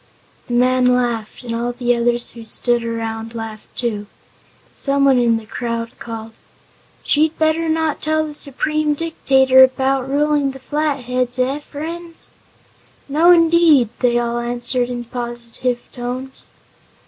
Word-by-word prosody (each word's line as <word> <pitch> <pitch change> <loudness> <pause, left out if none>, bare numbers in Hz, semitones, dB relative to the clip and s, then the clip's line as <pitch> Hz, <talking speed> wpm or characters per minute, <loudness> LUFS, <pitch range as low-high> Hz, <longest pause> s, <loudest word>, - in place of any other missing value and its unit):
The 240 - -2
man 255 +1 +3
laughed, 240 -2 -2
and 235 -1 -5
all 240 +1 -2
the 245 0 +1
others 240 0 0
who 230 - -11
stood 240 +1 0
around 225 0 -4
laughed, 225 -1 -8
too. 210 -4 -2 0.7
Some 280 0 +2
one 265 -2 +5
in 235 -2 +3
the 225 - -9
crowd 230 +1 -4
called: 225 -1 -7 0.7
"She'd 310 +2 +2
better 320 +1 +1
not 320 -1 0
tell 315 0 +1
the 300 - -7
Supreme 300 +2 0
Dictator 265 -5 +4
about 265 0 +1
ruling 290 0 +1
the 270 - -10
Flatheads. 255 -4 -1
Eh, 260 +3 0
friends?" 330 +3 -8 0.8
"No, 310 +5 +3
indeed!" 330 -7 +5
they 240 -1 +2
all 240 0 -1
answered 240 +1 0
in 240 -1 -4
positive 240 0 -4
tones. 255 +1 -6
250 Hz, 135 wpm, -19 LUFS, 240-295 Hz, 0.8 s, one